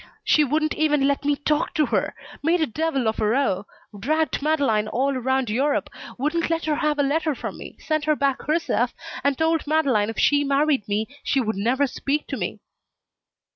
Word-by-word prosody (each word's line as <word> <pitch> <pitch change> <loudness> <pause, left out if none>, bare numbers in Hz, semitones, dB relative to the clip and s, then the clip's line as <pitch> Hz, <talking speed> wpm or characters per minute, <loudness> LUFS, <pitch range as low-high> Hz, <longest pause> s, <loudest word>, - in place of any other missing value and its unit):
"She 305 - +4
wouldn't 305 +2 0
even 295 -3 +2
let 280 0 0
me 290 0 +3
talk 300 +2 -1
to 305 -2 +3
her; - - -1 0.3
made 335 +4 +2
a 315 - +2
devil 275 -2 -1
of 220 - -1
a 215 - +1
row, 210 -5 +1 0.3
dragged 310 +6 0
Madeleine 275 -9 +1
all 270 +5 0
around 260 0 0
Europe, 275 +6 0 0.3
wouldn't 305 +6 0
let 330 -1 -1
her 310 - +1
have 300 0 0
a 285 - +2
letter 305 +1 0
from - - -6
me - - -10
sent 310 -1 -2
them 305 -1 +3
back 275 -2 0
herself 325 +2 0 0.3
and 280 -1 +1
told 320 -1 +1
Madeleine 275 -9 +2
if 225 - -6
she 290 0 +3
married 280 -3 +1
me 210 +2 -1 0.2
she 275 - +1
would 220 -3 -1
never 245 +8 +1
speak 280 +2 -2
to - - -2
me." - - -3
285 Hz, 195 wpm, -23 LUFS, 255-310 Hz, 0.3 s, She